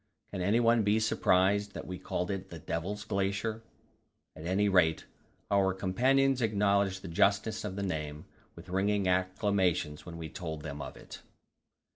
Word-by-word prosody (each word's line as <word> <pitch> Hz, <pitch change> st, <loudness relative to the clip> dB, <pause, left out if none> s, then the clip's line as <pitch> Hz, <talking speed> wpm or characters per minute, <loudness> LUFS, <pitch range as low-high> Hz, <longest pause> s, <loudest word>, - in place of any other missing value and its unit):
Can 95 Hz, -, -4 dB
anyone 115 Hz, +4 st, +3 dB
be 105 Hz, +1 st, +3 dB
surprised 100 Hz, -1 st, +2 dB
that -, -, -6 dB
we 90 Hz, 0 st, -6 dB
called 90 Hz, 0 st, -2 dB
it 95 Hz, -1 st, -5 dB
the 85 Hz, -, -8 dB
Devil's 85 Hz, +7 st, -4 dB
Glacier? 100 Hz, +3 st, -1 dB, 0.7 s
At 80 Hz, -, -7 dB
any 100 Hz, +3 st, +2 dB
rate, 90 Hz, -5 st, +3 dB, 0.5 s
our 95 Hz, -1 st, +3 dB
companions 130 Hz, +8 st, +2 dB
acknowledged 100 Hz, -3 st, +1 dB
the -, -, -6 dB
justness 100 Hz, +6 st, +1 dB
of 100 Hz, -3 st, -4 dB
the 100 Hz, -, -3 dB
name 75 Hz, -5 st, -4 dB, 0.3 s
with -, -, -12 dB
ringing 100 Hz, +1 st, +1 dB
acclamations 95 Hz, -4 st, +1 dB
when 85 Hz, -1 st, -8 dB
we 80 Hz, -1 st, -5 dB
told 80 Hz, -2 st, -6 dB
them 75 Hz, -2 st, -6 dB
of 65 Hz, -1 st, -7 dB
it. -, -, -11 dB
95 Hz, 155 wpm, -31 LUFS, 90-105 Hz, 0.7 s, anyone